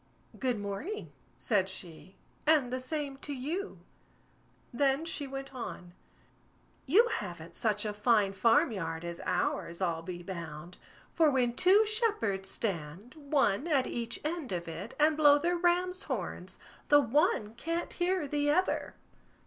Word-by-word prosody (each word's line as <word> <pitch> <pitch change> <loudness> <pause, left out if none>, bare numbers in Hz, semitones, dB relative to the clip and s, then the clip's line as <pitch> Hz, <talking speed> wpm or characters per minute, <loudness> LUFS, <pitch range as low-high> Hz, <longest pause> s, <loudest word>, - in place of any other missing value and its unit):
"Good 255 -3 0
morning", 205 - -5 0.3
said 195 -5 +1
she, 180 -1 -10 0.3
"and 290 -6 +4
the 255 - -1
same 280 +1 -4
to 290 +1 -5
you." 325 +10 -4 1.0
Then 275 +4 +2
she 295 -3 -2
went 270 0 -7
on: 180 -8 -7 0.9
"You 420 - +6
haven't 170 - -5
such 210 -1 0
a 210 - -2
fine 210 -2 +3
farm 230 - +4
yard 165 -4 -4
as 170 0 -6
ours, 175 -1 -1
I'll 170 -3 0
be 175 +1 -7
bound; 170 -1 -7 0.4
for 320 -2 +4
when 250 -4 +2
two 375 - +5
shepherds 420 - 0
stand, 190 +2 -4
one 285 -4 +1
at 280 -6 +2
each 235 -1 -3
end 315 - -3
of 175 -2 -3
it, 165 +7 -7
and 305 +1 +4
blow 295 -1 +7
their 345 +4 0
ram's 360 +2 +1
horns, - - -5 0.3
the 290 - +8
one 265 - +2
can't 330 +8 -3
hear 355 -3 0
the 290 +1 0
other." 365 +6 +1
255 Hz, 145 wpm, -31 LUFS, 195-310 Hz, 1.0 s, the